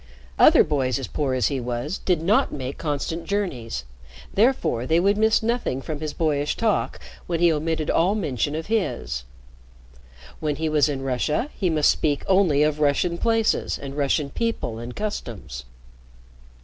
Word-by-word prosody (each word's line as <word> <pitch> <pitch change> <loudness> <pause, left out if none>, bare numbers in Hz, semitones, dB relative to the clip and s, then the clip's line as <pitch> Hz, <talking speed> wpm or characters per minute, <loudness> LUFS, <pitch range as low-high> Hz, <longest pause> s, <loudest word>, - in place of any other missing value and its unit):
Other - - +7
boys 130 -4 0
as 135 - -4
poor 135 -1 -1
as 125 - +2
he 140 -2 -2
was 125 +8 -3
did 175 -4 0
not 200 +6 +3
make 130 -1 -5
constant 160 +2 -3
journeys, 140 - -3 0.5
therefore 205 - +2
they 165 +1 +3
would 200 +3 +3
miss 220 +1 +3
nothing 230 - -1
from 150 +2 -5
his 155 -1 -3
boyish 150 -3 0
talk 220 -3 0 0.3
when 170 -2 -1
he 170 -1 +4
omitted 155 0 -1
all 185 +5 +2
mention 145 - -1
of 160 0 -4
his. 195 - -2 1.1
When 150 -2 -1
he 160 +2 -1
was 150 -1 +3
in 135 -2 -3
Russia, 140 - -1
he 185 - 0
must 155 -3 +4
speak 145 -2 -1
only 185 -7 +3
of 150 0 0
Russian 155 +4 +1
places 225 -1 +1
and 140 0 -7
Russian 140 0 0
people 230 - -2
and 120 +1 -7
customs. 115 - -5
155 Hz, 160 wpm, -24 LUFS, 135-185 Hz, 1.1 s, Other